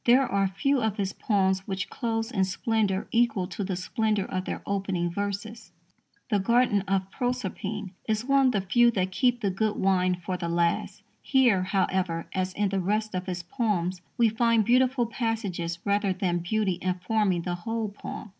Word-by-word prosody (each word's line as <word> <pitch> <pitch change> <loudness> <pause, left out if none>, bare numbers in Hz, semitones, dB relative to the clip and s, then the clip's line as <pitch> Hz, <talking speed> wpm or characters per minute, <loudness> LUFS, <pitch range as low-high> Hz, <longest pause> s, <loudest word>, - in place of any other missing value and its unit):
There 255 +2 +5
are 195 -2 +1
few 255 +8 +1
of 220 -2 -1
his 195 -2 -1
poems 190 -3 +1
which 190 -1 -2
close 225 -1 -2
in 195 -6 +1
splendour 200 0 0
equal 230 -5 +2
to 200 - -4
the 190 -1 -2
splendour 210 +2 0
of 185 -1 -3
their - - -4
opening 190 -3 -1
verses. 200 +2 -4 0.6
The 205 - +3
Garden 235 0 +3
of 195 0 0
Proserpine 215 -5 -3 0.2
is 220 +1 0
one 275 0 +4
of - - +3
the 200 - +1
few 240 +6 +4
that 190 -5 -1
keep 245 +4 +1
the 200 -3 +1
good 210 +3 0
wine 185 -1 +2
for 180 +1 -4
the 170 -1 -3
last. 170 0 0 0.2
Here, 245 -8 +3
however, 185 -3 0
as 185 0 -1
in 205 0 0
the 195 0 0
rest 215 +3 -1
of 185 +1 -3
his 180 -1 -3
poems, 185 -3 -1 0.2
we 235 - +5
find 225 0 +2
beautiful 255 +1 +3
passages 215 -8 -2
rather 200 -1 +2
than 175 -2 0
beauty 190 0 -1
informing 185 0 0
the 175 - -2
whole 225 +4 -3
poem. 210 +1 -8
200 Hz, 180 wpm, -27 LUFS, 185-225 Hz, 0.6 s, There